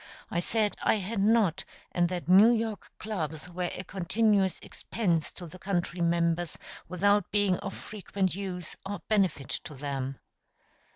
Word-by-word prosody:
I 170 - +1
said 210 +3 +1
I - - +3
had 210 +1 -3
not, 200 -4 +3 0.3
and 175 -1 +2
that 180 -2 -4
New 195 +5 +8
York 225 -3 -1
clubs 160 -7 -4
were 180 0 -3
a 185 - -6
continuous 195 +1 +2
expense 175 -9 -1
to 180 - -7
the 175 +3 -11
country 180 -2 -2
members 170 0 +1 0.3
without 200 +3 +2
being 205 -3 +2
of - - -5
frequent 195 -2 -2
use 180 -2 -5
or 200 +1 -5
benefit 190 - +2
to 155 -3 -5
them. 135 -1 -3
185 Hz, 150 wpm, -29 LUFS, 170-205 Hz, 0.3 s, New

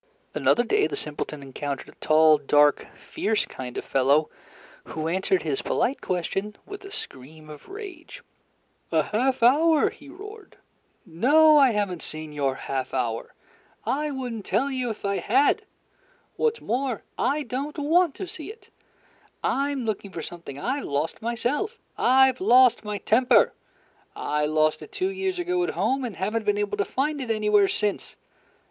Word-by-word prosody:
Another 240 - +3
day 415 - +2
the - - -4
simpleton 150 -1 -5
encountered 140 +1 -5
a - - -19
tall, 155 0 +5
dark, 145 +1 +3
fierce 215 0 -1
kind 125 -1 -8
of - - -4
fellow, 140 +4 +2 0.5
who 155 0 -4
answered 185 +2 +1
his 150 -4 -1
polite 270 - -1
question 195 +3 -2
with 405 0 -9
a 395 - -9
scream 155 - -9
of 150 - -13
rage. 390 -5 -9 0.7
"A - - +3
half 250 +3 0
hour," 305 +5 +4
he 285 - -15
roared. 415 +5 -12 0.5
"No, 290 - +5
I 275 -2 +6
have 205 -2 0
n't 175 - -6
seen 155 -1 -6
your 140 -2 0
half 130 -1 -4
hour; 115 -3 -2 0.5
I 300 +3 -1
would 260 -4 -4
n't 220 -3 -6
tell 275 +7 0
you 255 -2 -2
if 215 -2 -6
I 200 0 0
had; 285 - +2 0.7
what's 460 0 0
more, 250 0 -2 0.2
I 295 +2 +1
don't 275 +5 -4
want 320 +2 +2
to 380 - -5
see 345 +1 -7
it. 455 - -18 0.7
I'm 275 -2 0
looking 210 -2 -3
for 165 -3 -6
something 170 -6 -8
I've 265 - -2
lost 145 +3 -2
myself. 245 - -2 0.2
I've 260 0 +4
lost 245 +4 +5
my 210 -1 -3
temper. 245 +5 +3 0.6
I 150 0 -1
lost 155 0 +1
it - - -11
two 375 +1 -1
years 385 -1 -2
ago 360 0 0
at 355 - -1
home, 265 +1 0
and 235 -6 -4
have 200 +4 -2
n't 230 - 0
been 205 0 +2
able 205 0 -2
to 200 - +1
find 290 +2 -1
it 250 - -5
anywhere 210 -2 +3
since. 205 +1 -1
230 Hz, 165 wpm, -25 LUFS, -, 0.7 s, I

